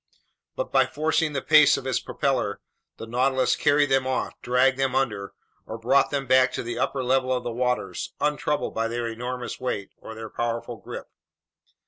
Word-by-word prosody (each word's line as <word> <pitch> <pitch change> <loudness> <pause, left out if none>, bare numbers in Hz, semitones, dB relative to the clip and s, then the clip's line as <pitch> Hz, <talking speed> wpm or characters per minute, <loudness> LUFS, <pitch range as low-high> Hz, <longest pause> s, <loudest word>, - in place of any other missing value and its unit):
But - - -3
by - - +4
forcing 155 +1 0
the 135 - -2
pace 150 -1 +6
of 130 - -7
its 130 -2 0
propeller, 125 -7 -1 0.4
the - - -7
Nautilus 130 +2 +1
carried 145 -1 +2
them 135 -1 +3
off, 130 - -1
dragged 130 +2 +2
them 135 -1 +1
under, 105 -7 -1 0.3
or 110 - -5
brought 130 +5 +3
them 140 -1 -2
back 130 0 +4
to - - -3
the 120 0 -4
upper 130 +1 -1
level 130 0 +1
of 125 -1 0
the 120 - -3
waters, 125 +1 -2
untroubled 150 0 -1
by 115 0 0
their 120 0 -3
enormous 125 +2 -5
weight 100 -6 -3
or 110 - -10
their 110 -1 -8
powerful 115 0 -3
grip. - - -8
130 Hz, 180 wpm, -25 LUFS, 120-135 Hz, 0.4 s, pace